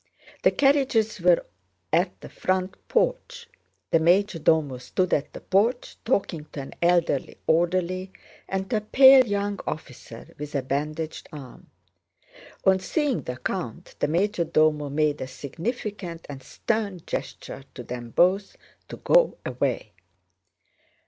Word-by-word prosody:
The - - +5
carriages 265 -8 +2
were 175 -1 +4 0.5
at 175 +4 +1
the - - -9
front 185 0 -1
porch. - - -1 0.4
The 165 - +5
major 180 +2 +3
domo 150 -5 +2
stood 180 +8 -1
at 145 - 0
the - - -10
porch 230 +6 +1
talking 195 - -1
to 140 - -4
an 135 - -9
elderly 170 -5 +1
orderly 180 +3 +1 0.4
and 190 0 -2
to 225 - +2
a - - -1
pale 260 +3 +7
young 205 0 -1
officer 125 -5 -8
with 150 0 -6
a 135 - 0
bandaged 150 +4 -3
arm. 140 -4 -11 1.0
On 190 0 +5
seeing 285 - 0
the 125 - -6
count 175 +3 -5
the - - +1
major 175 +3 +1
domo 155 -2 +2
made 150 0 0
a 130 - -3
significant 175 - -5
and 140 -2 -8
stern 200 - -2
gesture - - -6
to - - -7
them 120 -1 -7
both 190 - +2 0.3
to - - -8
go - - +3
away. 125 -3 -2
175 Hz, 135 wpm, -25 LUFS, 150-205 Hz, 1.0 s, pale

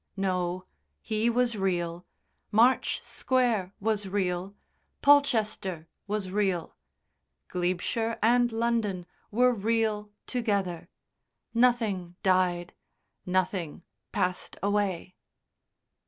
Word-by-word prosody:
No, 185 -2 -1 0.4
he 220 +2 +1
was 240 0 +2
real, 175 -3 -2 0.4
March 235 +5 +3
Square 235 -7 0
was 210 -1 0
real, 190 0 -1 0.5
Polchester 215 - +3 0.2
was 200 -2 -2
real, 190 -4 0 0.7
Glebeshire 185 +6 -1
and 240 +2 +3
London 225 -5 0 0.2
were 250 +3 +4
real 215 -1 0 0.2
together 200 -8 -1 0.6
nothing 225 -8 +2
died, 180 -2 +2 0.5
nothing 180 -3 -1 0.3
passed 185 -2 -2
away. 200 -3 0
200 Hz, 80 wpm, -28 LUFS, 180-230 Hz, 0.7 s, were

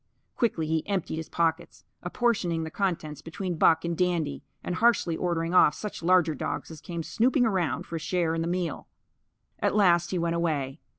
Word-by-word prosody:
Quickly 205 -10 0
he 160 0 -1
emptied 190 -5 -2
his 160 - -6
pockets; 170 0 -1 0.2
apportioning 175 -4 0
the 160 - -6
contents 160 -7 -2
between 175 0 -5
Buck 160 +1 +4
and 170 0 -1
Dandy, 165 -6 0 0.2
and 180 - -3
harshly 225 -8 +3
ordering 170 -1 -1
off 150 -4 +6
such 210 - -6
larger 175 -2 +3
dogs 150 - -4
as 155 -2 -10
came 170 -2 -5
snooping 245 - +2
around 180 - 0
for 165 - -5
a - - -4
share 170 0 0
in 165 - -1
the 165 - -1
meal. 175 -4 -3 0.7
At - - +1
last 175 -4 +4
he 185 - -1
went 170 -1 0
away. 150 -4 -1
170 Hz, 185 wpm, -27 LUFS, 160-185 Hz, 0.7 s, off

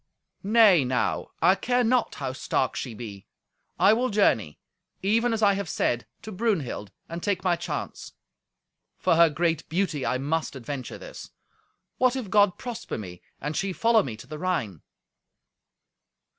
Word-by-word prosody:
"Nay, 205 -6 +5
now, 125 0 -1 0.2
I 180 +3 +7
care 245 +6 +1
not 245 +1 +1
how 135 -2 -4
stark 130 0 -1
she 120 -4 -5
be; 105 -4 -9 0.5
I 205 - +6
will 250 +3 +1
journey, 115 - +2 0.5
even 230 +5 +2
as 225 -1 -1
I 200 -1 +6
have 195 -4 -3
said, 120 0 -1 0.2
to 215 - -7
Brunhild, 180 - -2 0.2
and 170 +1 -6
take 190 -1 -1
my 180 -2 +3
chance. - - -5 0.8
For - - +2
her 170 0 +6
great 165 +1 -1
beauty 170 -5 -1
I 130 - 0
must 150 +3 -2
adventure 130 +1 -6
this. - - -10 0.7
What 255 0 +3
if 235 -8 -5
God 205 -3 +4
prosper 245 -3 -5
me, 90 -4 -8 0.2
and 150 +2 -4
she 195 -1 -1
follow 230 +3 +4
me 115 - -6
to 110 - -11
the 150 +3 -8
Rhine?" 155 - -2
175 Hz, 155 wpm, -26 LUFS, 130-215 Hz, 0.8 s, I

